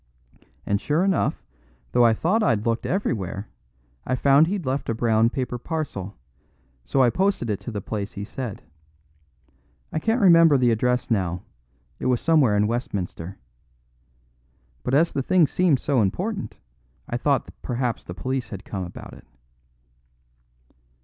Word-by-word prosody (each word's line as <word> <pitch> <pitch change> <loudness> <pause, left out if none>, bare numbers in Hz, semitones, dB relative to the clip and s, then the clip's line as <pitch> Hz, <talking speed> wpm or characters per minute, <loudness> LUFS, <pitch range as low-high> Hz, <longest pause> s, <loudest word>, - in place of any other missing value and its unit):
And 100 0 0
sure 155 +4 +1
enough, 195 -2 0 0.5
though 120 - +4
I 115 -1 +5
thought 185 - +1
I'd 115 - +1
looked 115 0 0
everywhere, 105 - -2 0.6
I 130 - -1
found 140 +4 +5
he'd 190 -3 -2
left 130 +1 -2
a 115 - 0
brown 115 0 +3
paper 125 -1 -3
parcel, 120 - -4 0.7
so 130 - +2
I 120 - +4
posted 185 - 0
it 100 - -2
to 120 - -7
the 105 -2 -4
place 100 +1 -4
he 100 - -5
said. 115 0 -6 1.3
I - - 0
can't 225 +8 +1
remember 165 - +6
the 125 -2 +3
address 125 +2 0
now; 90 -4 0 0.6
it - - -2
was 125 -2 +2
somewhere 145 -11 +3
in 105 - +3
Westminster. 100 -5 -4 1.4
But 130 - 0
as 165 +3 +4
the 135 - -1
thing 180 +4 +4
seemed 165 -3 +2
so 135 -3 +1
important, 190 - -2 0.5
I - - -3
thought - - 0
perhaps 120 -1 -2
the 90 - -8
police 130 +3 -3
had 100 -3 -8
come 95 -2 -4
about 90 - -9
it." - - -15
125 Hz, 150 wpm, -24 LUFS, 105-155 Hz, 1.4 s, remember